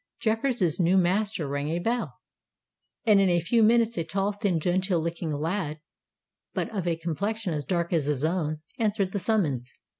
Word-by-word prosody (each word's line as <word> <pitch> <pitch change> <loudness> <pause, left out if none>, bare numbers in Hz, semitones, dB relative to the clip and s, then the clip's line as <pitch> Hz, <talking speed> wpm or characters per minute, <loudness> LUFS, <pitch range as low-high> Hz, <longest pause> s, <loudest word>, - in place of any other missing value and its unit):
Jeffreys' 220 - +1
new 180 +2 +4
master 185 -2 +1
rang 145 +1 -2
a 165 - 0
bell; 230 +7 -1 0.9
and 210 -3 +6
in 195 - +3
a 175 -1 +3
few 225 +8 +2
minutes 230 -2 +3
a - - 0
tall, 195 +5 -1
thin, 200 -4 0
genteel 180 +2 +1
looking 165 0 -3
lad, 155 +1 -2 0.8
but - - 0
of 185 -3 -2
a 170 - +1
complexion 175 +5 -2
as 150 -1 -2
dark 170 -2 -1
as 155 -4 +1
his 145 -2 0
own, 155 -2 -1 0.2
answered 205 -4 0
the 200 - -1
summons. 150 - +1
180 Hz, 175 wpm, -27 LUFS, 160-205 Hz, 0.9 s, and